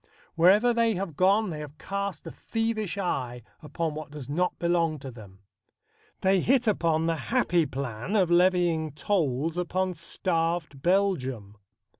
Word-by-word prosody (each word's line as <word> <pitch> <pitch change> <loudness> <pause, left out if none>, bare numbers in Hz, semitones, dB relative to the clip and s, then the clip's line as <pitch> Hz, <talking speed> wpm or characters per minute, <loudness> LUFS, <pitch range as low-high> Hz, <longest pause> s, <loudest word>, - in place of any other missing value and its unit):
Wherever 205 +8 +5
they 230 -2 +2
have 180 -4 -4
gone 195 +4 +3
they 155 - -5
have 150 0 -9
cast 200 +2 -4
a - - -6
thievish 225 -4 -2
eye 125 - -3 0.2
upon 160 +1 -3
what 155 0 -7
does 145 -3 -8
not 175 +6 -1
belong 170 -2 +1
to 135 -2 -8
them. 100 -5 -14 0.8
They 190 0 +3
hit 245 +6 +2
upon 165 -7 +1
the 165 0 +1
happy 175 - +2
plan 130 - -4
of 185 -5 +3
levying 175 -4 +3
tolls 160 - -1
upon 185 +1 -1
starved 165 -3 -2
Belgium. 135 - 0
170 Hz, 145 wpm, -27 LUFS, 150-195 Hz, 0.8 s, Wherever